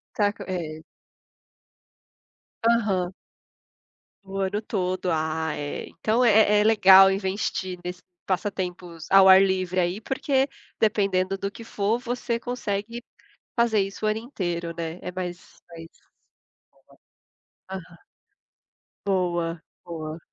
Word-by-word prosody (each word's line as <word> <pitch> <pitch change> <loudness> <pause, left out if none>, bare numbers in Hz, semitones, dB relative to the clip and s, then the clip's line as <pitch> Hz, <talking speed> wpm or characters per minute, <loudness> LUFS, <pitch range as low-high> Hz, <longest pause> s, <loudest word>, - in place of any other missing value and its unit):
Tá 205 -1 +2
com - - -10
é. 160 -4 -5 1.9
Aham. 195 -6 +1 1.1
O 195 0 -6
ano 195 +2 -1
todo. 185 -3 -2
Ah 160 0 -1
é, 145 0 -5
então 230 +3 0
é 210 -2 +5
é - - +3
legal 195 -3 +8
investir 190 -1 -2
nesse 180 0 -6 0.2
passatempos 180 -3 -3
ao 195 0 +8
ar 190 +1 +9
livre 185 -1 0
aí, 180 +3 -1
porque, 270 +3 0 0.3
dependendo 195 -3 +1
do 200 +1 -3
que 230 - -11
for, 220 0 -1
você 245 -1 -3
consegue 235 -1 -4 0.5
fazer 230 -3 +3
isso 195 +2 -4
o - - +3
ano 215 +1 0
inteiro, 175 -8 -4
né, 165 0 -4
é 180 - -5
mais 180 -1 -5 0.3
mais 165 -1 -10 1.8
Aham. 180 -3 -9 1.0
Boa, 175 -3 0 0.2
boa. 160 -2 -6
190 Hz, 115 wpm, -25 LUFS, 175-210 Hz, 1.9 s, ar